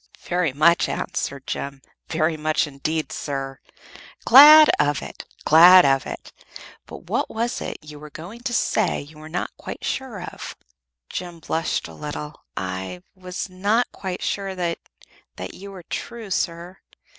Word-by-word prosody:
"Very 175 -4 0
much," 160 +5 +3
answered 140 -7 -4
Jem; 140 0 -5 0.3
"very 160 0 0
much, 155 +2 0
indeed, 155 +2 -3
sir." 135 -2 -5 0.7
"Glad 300 +5 +10
of 145 -1 +1
it! - - -9 0.2
Glad 175 +3 +8
of 135 -1 +2
it! - - -8 0.5
But - - -10
what - - -2
was 235 +2 -2
it - - -5
you 150 -1 -11
were 150 0 -10
going 175 +10 -10
to 250 0 -3
say 215 -3 +1
you 150 +2 -14
were 155 +1 -10
not 175 +2 -4
quite - - -7
sure 260 -7 -3
of?" - - -8 0.6
Jem 175 -2 -6
blushed 165 0 -2
a - - -12
little. 150 0 -7 0.2
"I 95 -1 -5
was 185 0 -6
not 205 +6 0
quite 185 -2 -6
sure 195 -1 -2
that 170 -2 -2 0.6
that - - -7
you 200 +1 -10
were 190 -3 -10
true, 225 +4 -7
sir. 175 +1 -3
170 Hz, 155 wpm, -23 LUFS, 150-190 Hz, 0.7 s, Glad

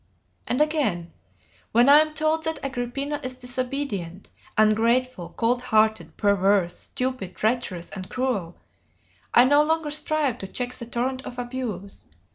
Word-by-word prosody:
And 250 - 0
again: 255 - 0 0.6
"When 240 +3 +5
I 290 +2 +9
am 310 0 0
told 315 +1 +1
that 320 0 -1
Agrippina 275 +3 -3
is 255 0 -4
disobedient, 250 -8 -3 0.3
ungrateful, 220 -2 +2
cold 245 +2 +1
hearted, 220 -2 +1
perverse, 200 -3 +2
stupid, 255 -8 -4
treacherous, 215 -6 -1
and 185 -1 -7
cruel, 230 -10 -2 0.7
I 245 - +7
no 290 +3 +5
longer 315 0 0
strive 300 -4 -1
to 195 - -5
check 245 +5 -4
the 235 -2 -4
torrent 255 +2 -2
of 245 - -8
abuse. 240 -6 -5
245 Hz, 135 wpm, -24 LUFS, 210-275 Hz, 0.7 s, I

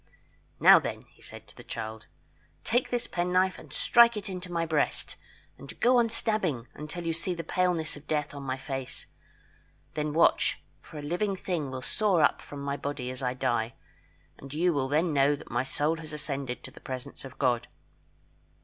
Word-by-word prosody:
"Now, - - +9
then," - - -4
he - - -24
said - - -11
to - - -16
the - - -11
child, 110 0 -6 0.6
"take 245 +2 +1
this 245 -1 -1
penknife 180 +1 +1
and - - -13
strike 235 -2 +5
it 205 0 -5
into 180 -1 -6
my 170 -1 0
breast, 155 -2 0 0.4
and 140 - -10
go 250 +1 +5
on 235 -1 +4
stabbing 215 - 0
the 115 - -11
flesh 120 - -27
until 150 +4 -6
you 165 - +1
see 175 +2 -1
the 165 - -4
paleness 175 -1 0
of 145 0 -13
death 150 -1 -1
on 140 - -7
my 130 -1 -2
face. 135 -1 -5 0.9
Then 150 -1 -1
watch 165 +3 +3 0.2
for - - -11
a 145 - -6
living 180 +6 0
thing 175 -6 -2
will 130 -1 -5
soar 195 -3 +2
up - - +3
from 145 -1 -8
my 140 0 -2
body 140 -4 -3
as 130 - -7
I 125 -1 -1
die, 120 -3 0 0.6
and 135 - -10
you 170 +4 +2
will 135 -3 0
then 155 +4 +2
know 140 +1 +4
that 145 - -12
my 120 +1 +1
soul 150 +4 0
has 155 -1 -8
ascended 140 -4 -3
to - - -8
the - - -15
presence 130 -1 -6
of 135 - -10
God. 120 -3 +1
150 Hz, 200 wpm, -29 LUFS, 135-180 Hz, 0.9 s, Now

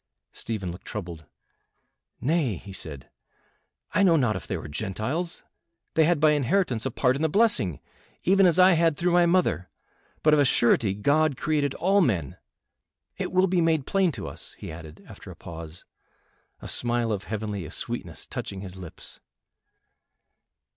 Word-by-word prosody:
Stephen 100 -6 -4
looked 90 +2 -11
troubled. 85 -7 -6 0.9
"Nay," 145 - +1
he 95 +4 -10
said, 75 -7 -7 0.8
"I - - +3
know 180 -4 +5
not 125 -8 +2
if - - -6
they - - -2
were - - -7
Gentiles, 110 - -3 0.5
they 160 - +4
had 170 -1 +2
by 155 0 +5
inheritance 145 - +1
a - - -1
part 125 +1 +1
in 140 - -3
the 160 - +2
blessing, 170 - +2 0.4
even 195 +1 +5
as 170 - +3
I 185 +1 +7
had 165 -3 +3
through 175 0 +1
my 175 0 +5
mother; 170 - +1 0.5
but 155 - +5
of 150 - +5
a - - +6
surety 115 -6 +3
God 145 +6 +2
created 145 -2 0
all 195 +3 +3
men. 90 - 0 0.8
It - - -2
will 185 +1 +4
be 180 -2 +1
made 160 -4 +2
plain 195 -3 +2
to - - -6
us," 70 - -10
he - - -8
added, 80 -1 -11
after - - -12
a - - -9
pause, 80 0 -10 0.8
a - - -6
smile 120 -1 0
of 105 -1 -3
heavenly 105 -6 -4
sweetness - - -2
touching 95 -1 -6
his 95 -2 -8
lips. 90 -3 -11
130 Hz, 165 wpm, -26 LUFS, -, 0.9 s, I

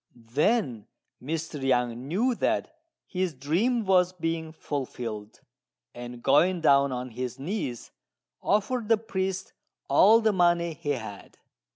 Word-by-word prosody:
Then 125 - 0 0.3
Mr. 155 +2 -4
Yang 125 -3 +1
knew 225 - +1
that 325 +8 -1 0.3
his 180 -4 -2
dream 200 - 0
was 185 -1 +3
being 165 -2 -3
fulfilled; 120 -8 -5 0.5
and 120 0 -9
going 175 +6 +4
down 140 -3 +4
on 125 0 -4
his 125 +1 -5
knees 135 - -4 0.5
offered 215 +3 0
the 225 - +5
priest 190 -3 -3 0.3
all 220 +4 +6
the 220 -2 +2
money 175 -2 +2
he 145 - -6
had. 110 -6 -8
160 Hz, 120 wpm, -27 LUFS, 125-190 Hz, 0.5 s, all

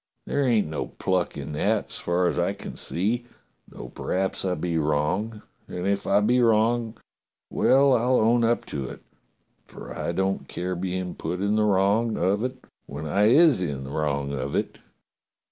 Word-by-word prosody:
There 145 - -1
ain't 120 -6 +3
no 75 -1 -4
pluck 90 -4 -1
in 70 +1 -6
that, 75 - 0
as - - -3
far 90 +1 0
as 90 - 0
I 90 +3 +1
can 100 - -9
see, 115 +7 -2 0.4
though - - -10
p'raps 95 +1 -2
I 90 -2 0
be 85 -2 -1
wrong, 75 +9 -1 0.2
and 90 0 -5
if 100 0 0
I 100 +1 +4
be 125 +4 +3
wrong, 115 0 +2 0.5
well, 135 0 +4
I'll 125 +1 +3
own 115 +2 +3
up 115 +1 +1
to 70 -2 -2
it, - - -11 0.6
for - - -10
I - - -2
don't 95 +2 -1
care 90 +1 -3
bein' 90 0 -3
put 85 +3 -4
in 100 +2 +1
the 110 0 +3
wrong 105 +3 +2
of 100 +5 +1
it 130 0 -5 0.2
when 70 +3 -6
I 100 +7 +2
is 140 - +5
in 70 -6 -3
the 65 - -8
wrong 70 -2 -1
of 70 +1 -3
it." - - -2
95 Hz, 180 wpm, -25 LUFS, 85-115 Hz, 0.6 s, is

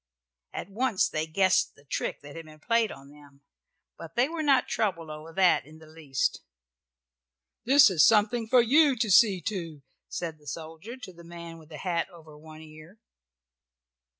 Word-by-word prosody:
At - - -6
once 220 -1 +1
they 155 +1 -3
guessed 185 +3 +2
the 145 - -21
trick 140 - -4
that 145 +1 -12
had 165 -1 -8
been 155 0 -14
played 230 +4 +1
upon 135 -4 -12
them, 145 -1 -18 0.6
but 165 0 -10
they 245 +2 +3
were 325 +1 -4
not 275 -4 +3
troubled 170 -7 -2
over 155 +2 -9
that 185 +1 +3
in 155 +1 -14
the 160 - -15
least. 155 -4 -3 1.2
"This 275 +2 +7
is 165 -5 +4
something 225 +1 +3
for 245 +1 +5
you 285 +3 +4
to 225 -3 -1
see 190 -2 +5
to," 165 -9 -5 0.3
said 165 -3 -5
the 150 - -20
soldier 165 - -8
to 220 -8 -10
the 170 0 -15
man 170 -1 -10
with 160 -1 -17
the 155 - -9
hat 170 0 -2
over 160 -4 -15
one 155 +1 -13
ear. 155 +5 -15
170 Hz, 180 wpm, -27 LUFS, 155-220 Hz, 1.2 s, This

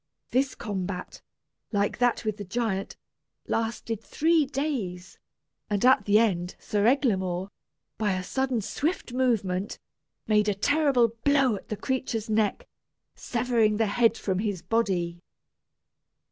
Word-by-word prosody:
This 265 +2 +1
combat, 190 -4 -5 0.5
like 205 0 0
that 245 -2 +2
with 215 -1 -1
the 205 - -5
giant, 195 -1 -2 0.5
lasted 225 -1 -2
three 320 -2 +2
days, 255 -11 -3 0.5
and 205 +2 +1
at 255 -5 +5
the 205 0 +5
end 185 -6 +1
Sir 210 +1 0
Eglamour, 190 -9 +1 0.5
by 210 -3 +1
a 185 0 -2
sudden 260 +3 -1
swift 280 - -2
movement, 210 -7 0 0.5
made 210 -1 +3
a 205 - 0
terrible 275 0 +3
blow 275 -5 +4
at 195 - -10
the 215 - -3
creature's 240 -4 -2
neck, 220 - +1 0.5
severing 230 -3 +1
the 225 - +2
head 230 +2 +2
from 190 -3 -1
his 200 -5 -2
body. 180 -5 0
220 Hz, 130 wpm, -27 LUFS, 195-250 Hz, 0.5 s, at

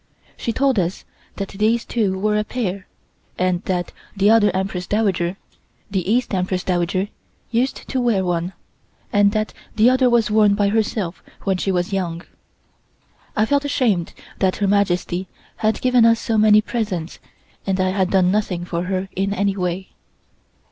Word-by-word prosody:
She 230 - -2
told 265 -1 +2
us 175 +1 -2 0.3
that 195 -1 -4
these 220 +3 +1
two 205 -5 0
were 210 +2 +1
a 210 - +2
pair, 200 -5 -4 0.5
and 180 -1 +1
that 180 -2 -1 0.3
the 200 +2 +4
other 220 -2 +5
Empress 185 -1 -3
Dowager 190 -4 0 0.5
(the 190 0 -1
East 245 -1 +1
Empress 185 -1 -1
Dowager) 185 +2 0 0.4
used 250 +3 -1
to 260 - -1
wear 215 -6 +1
one, 175 +1 -1 0.6
and 205 -1 +5
that 215 -1 -1 0.2
the 225 +3 +5
other 255 -1 +3
was 235 -3 +2
worn 210 -1 +4
by 200 -1 +2
herself 210 -4 -1 0.2
when 190 -2 +1
she 195 - -1
was 180 +1 -1
young. 175 -3 -2 1.1
I 215 - +3
felt 285 +4 +1
ashamed 225 -11 0 0.2
that 190 -1 +2
Her 200 - 0
Majesty 190 -2 +1 0.3
had 215 -1 0
given 250 -2 +4
us 230 0 +5
so 225 - -1
many 215 0 +6
presents 205 -9 -3 0.5
and 190 -1 0
I 185 0 +2
had 190 -1 +1
done 185 -2 +3
nothing 190 -4 -1
for 175 0 -3
her 190 +1 -2
in 195 +2 0
any 200 0 +1
way. 180 0 -3
195 Hz, 165 wpm, -21 LUFS, 185-220 Hz, 1.1 s, many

